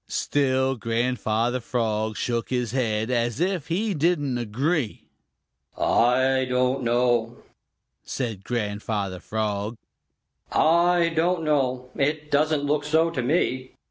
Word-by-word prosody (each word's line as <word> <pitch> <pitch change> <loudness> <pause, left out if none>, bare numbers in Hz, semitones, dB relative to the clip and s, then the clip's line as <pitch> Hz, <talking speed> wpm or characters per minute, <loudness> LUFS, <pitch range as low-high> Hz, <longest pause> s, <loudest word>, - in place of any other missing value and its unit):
Still 130 -2 +1
Grandfather 115 0 0
Frog 110 -3 -2
shook 120 -1 -2
his 125 -3 -1
head, 115 -2 -1
as 120 0 0
if 180 -3 -1
he 200 +5 0
didn't 145 -6 +1
agree. 125 +3 -1 0.7
"I 130 +2 +3
don't 125 +1 +1
know," 120 -1 +1 0.7
said 115 -7 -4
Grandfather 105 -4 -3
Frog, 105 +1 -3 0.7
"I 170 +1 +4
don't 165 +1 +1
know. 130 -4 0
It 150 +2 -1
doesn't 150 0 +2
look 145 0 +1
so 160 +2 +2
to 135 - -2
me." 130 -2 0
125 Hz, 110 wpm, -25 LUFS, 115-150 Hz, 0.7 s, I